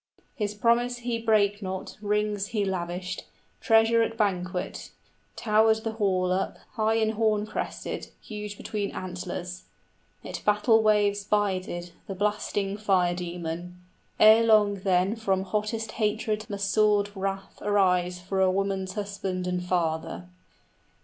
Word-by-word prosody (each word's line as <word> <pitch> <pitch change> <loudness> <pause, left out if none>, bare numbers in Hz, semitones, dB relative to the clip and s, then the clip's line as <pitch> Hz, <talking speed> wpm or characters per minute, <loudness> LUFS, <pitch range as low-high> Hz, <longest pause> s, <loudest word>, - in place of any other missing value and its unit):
His 210 -4 -3
promise 240 +3 +2
he 235 -2 -1
brake 210 -2 +2
not, 190 -1 -5
rings 210 -1 0
he 210 -2 -1
lavished, 180 0 -3 0.3
Treasure 225 0 +4
at 225 0 -1
banquet. 185 -3 -2 0.5
Towered 220 0 +3
the 225 - -1
hall 190 -4 +1
up 190 +1 -1 0.2
High 220 -1 +1
and 220 -1 +2
horn 215 -1 +1
crested, - - -4
huge 210 -1 -7
between 205 -2 -3
antlers: 180 0 -6 0.6
30 - - -8
It - - -5
battle 210 +2 +4
waves 205 -1 +3
bided, 185 -4 -1 0.2
the 195 - -5
blasting 205 0 -1
fire 190 -4 +2
demon; 175 0 -5 0.4
Ere 220 +1 +8
long 210 -3 +4
then 185 +2 +2
from 195 -4 0
hottest 215 +3 -2
hatred 215 -1 -1
must 200 -1 -2
sword 210 -1 +3
wrath 195 0 -4
Arise 180 -3 +2
for 190 +2 -2
a 190 - +5
woman's 190 0 -1
husband 195 -3 -3
and 180 0 -1
father. 175 -1 -1
200 Hz, 135 wpm, -27 LUFS, 185-215 Hz, 0.6 s, Ere